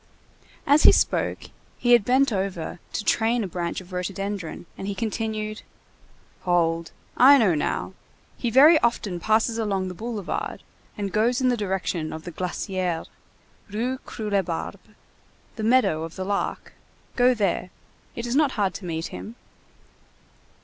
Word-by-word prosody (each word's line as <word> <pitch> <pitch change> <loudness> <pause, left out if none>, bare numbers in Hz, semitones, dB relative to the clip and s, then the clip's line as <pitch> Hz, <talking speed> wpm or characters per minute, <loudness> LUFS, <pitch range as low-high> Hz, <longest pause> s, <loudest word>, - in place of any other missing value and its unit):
As 290 +2 +5
he - - +9
spoke, - - +1 0.3
he 245 - +1
had 240 -3 +7
bent 260 +2 +3
over 190 -3 -3
to - - -3
train 230 +1 +2
a - - -3
branch 175 0 -3
of 185 0 -14
rhododendron, 190 -1 -4
and 195 - -6
he 200 - -3
continued:— 215 0 -3 0.8
"Hold, 170 -2 +1 0.3
I 275 +3 +8
know 215 -9 +4
now. 150 - -2 0.4
He 240 - -2
very 295 +7 +7
often 210 -6 0
passes 220 +4 +1
along 195 -4 -1
the - - -6
boulevard, 215 -1 -4 0.3
and 200 -2 -3
goes 235 +4 +2
in 255 -1 +2
the 245 - +2
direction 190 -6 -2
of 160 - -7
the 175 - -7
Glacière, 180 0 -3 0.6
Rue 245 +5 -2
Croulebarbe. 200 -9 -3 0.8
The 220 - -5
meadow 225 -9 +3
of 165 0 -6
the 185 - -4
Lark. 200 +1 -3 0.4
Go 250 0 +4
there. 195 -4 0 0.5
It 235 - -4
is 240 +1 -2
not 290 -2 +3
hard 195 -4 0
to 195 - -8
meet 165 -1 -3
him." 225 - -8
205 Hz, 150 wpm, -25 LUFS, 180-235 Hz, 0.8 s, he